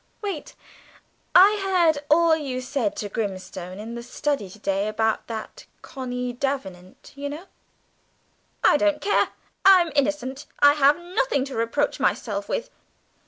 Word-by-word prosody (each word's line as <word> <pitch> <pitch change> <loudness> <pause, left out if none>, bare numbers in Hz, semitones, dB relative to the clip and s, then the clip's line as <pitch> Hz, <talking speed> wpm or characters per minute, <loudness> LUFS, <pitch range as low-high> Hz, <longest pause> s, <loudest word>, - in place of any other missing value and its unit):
Wait. 390 -8 -5 0.8
I 405 +3 +7
heard 345 -6 +3
all 330 +1 +5
you 275 -5 -4
said 250 -4 -2
to 210 - -4
Grimstone 190 -3 -5
in 220 +3 -7
the 235 - -6
study 245 -3 -2
to 190 - -13
day 200 -1 -1
about 220 +1 -1
that 220 -2 -6
girl - - -17
Connie 250 -2 -4
Davenant, 195 -9 -5
you 285 0 -5
know." 305 +6 -7 1.2
"I - - +6
don't 305 0 +2
care; 410 - +2 0.4
I 385 -1 +8
am 340 -2 -2
innocent. 280 -1 -1
I 285 0 +6
have 290 +1 +4
nothing 350 - -1
to 275 - -7
reproach 230 +7 0
myself 205 -6 -1
with." - - -3
270 Hz, 150 wpm, -24 LUFS, 220-310 Hz, 1.2 s, I